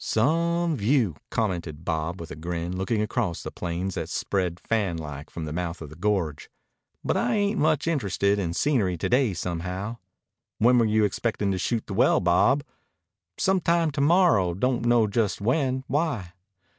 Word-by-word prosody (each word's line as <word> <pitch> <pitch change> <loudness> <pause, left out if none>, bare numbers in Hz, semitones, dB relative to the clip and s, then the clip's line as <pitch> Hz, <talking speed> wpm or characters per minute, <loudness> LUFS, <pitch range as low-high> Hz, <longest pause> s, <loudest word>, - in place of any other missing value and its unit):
"Some 170 +7 +1
view," 110 - +2
commented 85 -7 -2
Bob 80 +2 -2
with 85 -2 -8
a - - -5
grin, 85 +2 -4
looking 105 +3 0
across 105 -5 -2
the - - -5
plains 90 +2 -3
that - - -4
spread 90 -3 -1
fanlike 80 -10 -3
from 80 - -6
the 75 - -5
mouth 90 0 -3
of 75 -2 -9
the - - -10
gorge. 90 -5 -1 0.5
"But - - 0
I 120 - +1
ain't 205 0 +1
much 155 -1 +2
interested 100 - +1
in 85 -3 -2
scenery 110 - +1
to - - -2
day 125 -6 +2
somehow." 90 +6 -4 0.6
"When 120 +2 +5
were 115 - +4
you 110 0 +2
expectin' 105 -1 -1
to 95 - -1
shoot 115 +4 -1
the 100 - -6
well, 110 - +4
Bob?" 95 +11 +3 0.7
"Some 190 -1 +2
time 170 -1 +2
to 145 0 -2
morrow. 140 - +4
Don't 120 +3 0
know 120 -2 +4
just 105 0 0
when. 130 +4 0
Why?" 130 - -1
105 Hz, 170 wpm, -26 LUFS, 90-130 Hz, 0.7 s, When